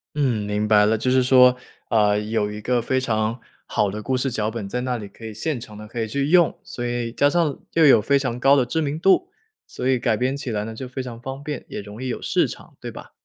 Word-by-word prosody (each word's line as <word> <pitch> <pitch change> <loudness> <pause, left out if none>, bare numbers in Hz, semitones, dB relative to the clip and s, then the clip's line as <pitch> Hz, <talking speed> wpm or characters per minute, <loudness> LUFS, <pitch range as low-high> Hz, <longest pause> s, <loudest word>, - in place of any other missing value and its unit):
嗯， 120 -8 0
明 105 +1 -1
白 105 -1 +5
了。 110 +1 +2
就 125 +4 0
是 130 0 +4
说， 125 0 +6 0.3
呃， 105 -2 +3
有 105 -1 -1
一 105 - -6
个 125 +2 +1
非 130 +3 0
常 115 -2 -1 0.3
好 100 -2 0
的 105 +2 -5
故 130 +4 -1
事 130 +1 -1
脚 110 -2 -1
本 110 -3 -5
在 125 +5 -3
那 125 -1 -1
里， 105 -3 -7
可 115 - -17
以 110 - -5
现 135 +5 -2
成 110 -3 -10
的 105 0 -9
可 115 +2 -5
以 110 - -1
去 140 +5 -1
用， 175 -1 +4
所 120 - -6
以 120 -1 -2
加 140 +4 +3
上 160 -3 0
又 165 -1 +5
有 135 -6 +7
非 140 +6 +3
常 125 -3 -2
高 135 +2 +5
的 135 -3 +3
知 160 +6 -1
名 150 +1 -2
度， 195 - +3 0.4
所 - - -4
以 130 -1 +2
改 115 -2 +1
编 130 +3 0
起 140 -2 -5
来 105 -2 -1
呢， 110 - -6
就 125 +3 -7
非 130 +1 -5
常 120 -2 -8
方 135 +2 -7
便， 145 -3 -5
也 - - -6
容 105 +3 -10
易 - - -3
有 125 - -3
市 - - +1
场， - - -11
对 - - -5
吧？ - - -11
125 Hz, 290 characters per minute, -23 LUFS, 110-135 Hz, 0.4 s, 有